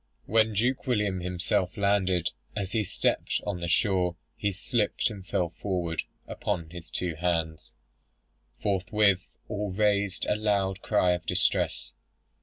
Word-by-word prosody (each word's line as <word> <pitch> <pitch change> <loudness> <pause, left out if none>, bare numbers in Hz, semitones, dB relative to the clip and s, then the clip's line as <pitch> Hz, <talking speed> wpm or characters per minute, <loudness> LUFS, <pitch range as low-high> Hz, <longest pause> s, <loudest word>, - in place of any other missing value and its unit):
"When 110 0 +3
Duke 125 +6 +1
William 105 -6 +1
himself 90 +1 -1
landed, 95 -3 +2 0.2
as 100 -2 -2
he 110 -2 +1
stepped 95 - 0
on 100 -4 -2
the 85 - -3
shore, 90 -1 +2 0.2
he 100 - 0
slipped 105 +4 0
and 100 -3 -8
fell 90 -2 0
forward 85 -4 -2 0.3
upon 85 -6 -3
his 85 -1 -9
two 90 -2 -2
hands. 80 -1 -2 0.9
Forthwith 100 -1 +2 0.2
all 105 0 -2
raised 100 -1 +1
a - - +2
loud 100 -3 0
cry 100 -4 +3
of 90 -1 -2
distress. - - +1
95 Hz, 135 wpm, -28 LUFS, 90-105 Hz, 0.9 s, When